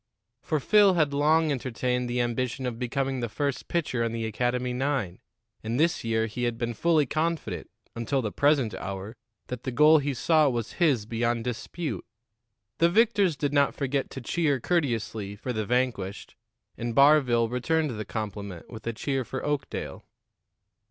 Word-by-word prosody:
For 155 - -1
Phil 200 +5 +5
had 155 -4 +2
long 155 +2 +3
entertained 125 -1 -1
the 120 0 0
ambition 125 +2 -2
of 120 -2 -3
becoming 135 +1 -1
the 120 -1 -2
first 140 +4 -2
pitcher 145 -8 -1
on 115 -1 -1
the 115 -1 -2
academy 125 +3 -1
nine, 125 -8 -1 0.4
and 115 +4 -2
this 165 +2 +2
year 110 -1 +1
he 120 +3 -3
had 120 -1 -1
been 120 0 -2
fully 160 +4 +2
confident 155 - -2 0.3
until 115 +4 -1
the 110 -5 -2
present 140 -5 +2
hour 100 +3 -6 0.3
that 125 -1 -6
the 130 - -3
goal 150 +5 +6
he 140 -1 -2
sought 155 +1 +3
was 120 -2 -3
his 135 -11 +3
beyond 115 +1 -1
dispute. 120 - -4 0.8
The 170 - +5
victors 205 -4 +3
did 145 -1 -1
not 140 -1 +3
forget 140 -1 -1
to 135 - -7
cheer 145 +1 0
courteously 115 - -1
for 125 +5 -4
the 110 -2 -2
vanquished, 120 -6 -1 0.4
and 120 0 -4
Barville 140 -5 +5
returned 150 +5 0
the 110 -2 -4
compliment 100 -4 -6
with 110 -1 -9
a 115 - -1
cheer 135 +3 -2
for 130 +2 -5
Oakdale. 145 -2 -3
125 Hz, 165 wpm, -27 LUFS, 115-145 Hz, 0.8 s, goal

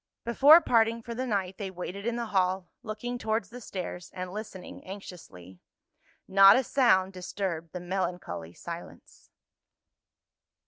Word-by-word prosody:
Before 280 +7 +8
parting 230 -4 +2
for 235 - -6
the 255 +2 -3
night 195 -3 -2
they 200 -2 -3
waited 190 +3 -6
in 235 - 0
the 235 0 -2
hall, 185 -1 +1
looking 240 +3 -5
towards 220 -3 -1
the 245 +1 -9
stairs, 180 -4 -6
and 185 0 -5
listening 205 -3 -8
anxiously. 165 - -11 0.7
Not 195 +1 +8
a 265 - +2
sound 195 -8 +3
disturbed 180 -3 -4
the 180 - -6
melancholy 175 - -4
silence. 170 0 -10
195 Hz, 135 wpm, -28 LUFS, 180-230 Hz, 0.7 s, Before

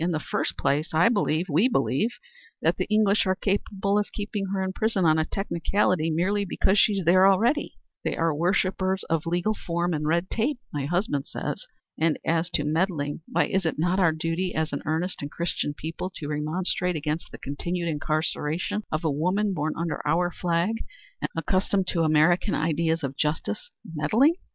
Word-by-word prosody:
"In 175 - +1
the 160 -3 0
first - - -2
place 155 +3 0
I 170 +7 +5
believe 185 -7 +1
we 175 - +3
believe 210 - +1 0.5
that - - +2
the - - -1
English 215 -2 +3
are 185 - +2
capable 200 0 0
of 205 - -3
keeping 205 -1 -3
her 190 0 -1
in 190 0 -2
prison 215 -4 +1
on 155 0 +4
a 155 - +1
technicality 180 -2 0
merely 185 +6 +1
because 195 +1 +2
she 210 - +5
is 195 -3 -2
there 185 +3 +6
already. 230 +10 +2 0.3
They - - -2
are 165 -1 +2
worshippers 185 +3 +1
of 165 0 0
legal 175 +5 +1
form 175 -3 -2
and 150 -1 -1
red 170 +3 +1
tape, 250 +5 0 0.2
my 145 -2 -2
husband 175 -5 -1
says. - - -5 0.3
And 160 -1 +2
as 165 +1 +1
to 145 - +1
meddling, 155 -1 -1
why - - +2
is 190 0 0
it 160 - -1
not 175 +4 +1
our 170 -4 +5
duty 165 +3 -2
as 160 -1 0
an 140 - -2
earnest 165 +4 -1
and 145 - -4
Christian 170 -3 -2
people 165 +5 -5
to 145 - -6
remonstrate 175 +4 -1
against 155 +1 -3
the - - -8
continued 170 +5 -3
incarceration 155 +5 -1
of 155 +2 -1
a 160 - +1
woman 185 +8 +1
born 155 -2 -1
under 165 -2 -2
our 175 +1 +2
flag 175 +6 0 0.4
and - - -1
accustomed 190 +3 +1
to 170 - 0
American 160 +5 +3
ideas 160 +1 0
of 135 0 -3
justice? 155 - -2 0.2
Meddling? 210 - +3
170 Hz, 185 wpm, -26 LUFS, 155-195 Hz, 0.5 s, there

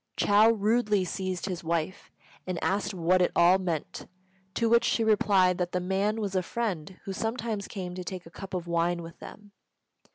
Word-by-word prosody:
Chou 210 +2 +5
rudely 210 -2 +1
seized 185 0 -3
his 180 -3 -4
wife, 170 +2 -2 0.4
and 185 -1 -2
asked 200 +2 0
what 180 0 +2
it 180 - +3
all 175 +2 +5
meant; 170 -5 -4 0.5
to 230 - +1
which 235 +1 +4
she 230 - +1
replied 195 -4 +3
that 175 0 -2
the 180 - +1
man 195 +4 0
was 200 -3 -3
a 185 - +3
friend 185 -4 -4
who 195 - -4
sometimes 225 -1 -3
came 180 -3 -6
to 180 0 -6
take 180 0 -6
a 165 - -13
cup 190 +2 -7
of 175 -2 -3
wine 170 0 0
with 165 0 -11
them. 205 -1 -12
185 Hz, 190 wpm, -28 LUFS, 175-210 Hz, 0.5 s, Chou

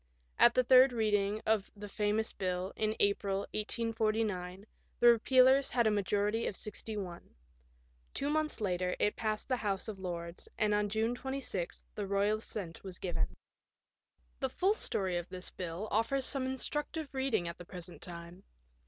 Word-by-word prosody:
At 240 - +7
the 255 - +5
third 255 +1 +7
reading 210 -2 +1
of 215 -2 +2
the 205 0 -8
famous 210 +2 0
bill, 185 0 -2
in 215 0 0
April, 200 -1 +2
1849, 215 -4 -1 0.3
the 240 - +8
repealers 260 +3 +5
had 240 -2 +2
a 220 - +4
majority 205 +2 +1
of - - -3
61. 200 -4 -6 0.8
Two 285 +1 -1
months 310 0 0
later 180 -3 0
it 210 - +1
passed 215 -1 -2
the 255 - +1
House 200 -3 -2
of 210 -3 -6
Lords, 170 -2 -5
and 210 -1 +2
on 210 0 +1
June 220 +3 +1
26 265 -9 -4
the 205 -2 -4
royal 200 +2 +2
assent 190 -6 -6
was 185 -3 -7
given. 180 -2 -2 1.0
The 265 - 0
full 380 +9 +2
story 190 - -1
of 175 0 -5
this 185 0 -1
bill 180 +3 -5
offers 255 +5 +1
some 265 -2 -1
instructive 295 +3 -3
reading 265 -10 0
at 170 - -6
the - - -7
present 180 0 -9
time. 170 +1 -8
210 Hz, 160 wpm, -33 LUFS, 190-240 Hz, 1.0 s, the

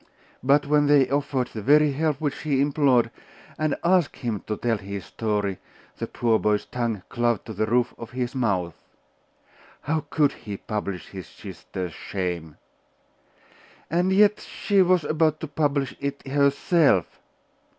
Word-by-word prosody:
But 140 +3 +3
when 145 0 +3
they 145 -2 +5
offered 140 -3 0
the 110 - -5
very 150 +5 +5
help 150 0 0
which 150 -3 -2
he 145 -4 0
implored, 140 -4 +3 0.5
and 155 -1 +1
asked 175 -2 +3
him 115 -5 -3
to 105 - -2
tell 115 -3 0
his 100 -1 -6
story, 105 -4 -2 0.4
the - - -3
poor 115 -2 +1
boy's 105 -1 +1
tongue 115 -6 -3
clove 120 -3 0
to 110 - -8
the 110 +2 -1
roof 120 +2 +1
of 115 - -7
his 125 -1 -3
mouth. 95 -9 0 1.1
How 155 +2 -1
could 145 -3 +3
he 105 -6 -8
publish 100 -4 -5
his 95 -4 -8
sisters 90 -3 -7
shame? 85 -5 -4 1.3
And 175 +3 +2
yet 210 +2 +5
she 200 -2 +1
was 180 -2 +3
about 155 0 +1
to 160 - -4
publish 145 -3 -1
it 140 0 -4
herself!.... 140 - +2
135 Hz, 150 wpm, -25 LUFS, 105-150 Hz, 1.3 s, they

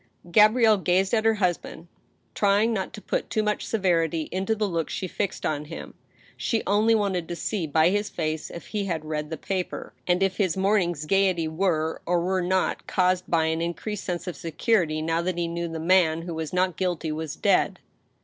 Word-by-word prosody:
Gabrielle 215 +2 +6
gazed 185 +3 +1
at 220 -1 +2
her 225 0 +4
husband, 175 -3 -2 0.5
trying 205 +3 +3
not 190 -3 -2
to - - -9
put - - -2
too 215 - 0
much 210 0 -1
severity 165 -6 +1
into 190 +4 0
the 215 -1 0
look 165 -4 -2
she 185 - -3
fixed 200 +2 -3
on 150 -1 -1
him. 165 +2 -8 0.4
She 225 - -1
only 215 +3 +3
wanted 195 -5 0
to 175 - -4
see 180 -1 -2
by 160 +3 +4
his 205 +1 0
face 155 -2 -3
if 170 - -9
he 210 -2 -3
had 165 -5 -3
read 150 -1 -3
the 160 - -4
paper, 185 +3 -4
and 180 +1 +3
if 190 -1 0
his 190 -3 +1
morning's 185 -6 +1
gayety 185 -2 +2
were, 160 -1 0
or 175 0 +2
were 185 +2 0
not, 185 +1 0
caused 185 0 +1
by 165 -2 +2
an 160 +1 0
increased 190 +4 -4
sense 175 -1 -3
of 180 - -5
security 165 -2 0
now 165 +1 0
that 180 0 -2
he 170 -1 0
knew 170 0 -3
the 165 -1 -5
man 165 -1 +3
who 170 -1 -5
was 160 -1 -4
not 185 -1 +1
guilty 175 -4 -1
was 155 -1 -4
dead. - - +2
180 Hz, 200 wpm, -25 LUFS, 165-195 Hz, 0.5 s, Gabrielle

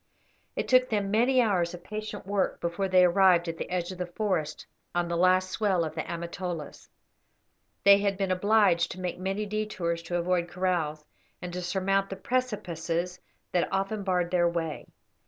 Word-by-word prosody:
It - - -2
took 255 0 +4
them 205 -3 -1
many 250 +4 +4
hours 180 -5 0
of 175 - -13
patient 215 0 -6
work 200 0 -1
before 170 +3 -1
they 185 -1 +5
arrived 180 -1 +4
at 165 0 -4
the - - -4
edge 180 0 -2
of 185 - -9
the 180 - -2
forest 175 -5 -2 0.3
on 175 0 +1
the 170 - -2
last 185 +1 +3
swell 195 -6 +1
of 155 - -4
the 160 - -2
Amatolas. 170 -1 -6 0.9
They 200 0 +8
had 200 -1 0
been 195 -1 -1
obliged 190 -2 +3
to 185 - -11
make 180 -1 -4
many 195 +3 -2
detours 200 -5 -2
to 175 +1 -3
avoid 175 0 0
kraals, 170 -5 -1 0.3
and 180 -1 -7
to 180 - -3
surmount 195 +2 0
the 195 - -4
precipices 180 -7 -2 0.3
that 175 - 0
often 195 +2 -1
barred 180 -2 0
their 175 -1 +3
way. 165 -2 -4
185 Hz, 175 wpm, -28 LUFS, 170-200 Hz, 0.9 s, They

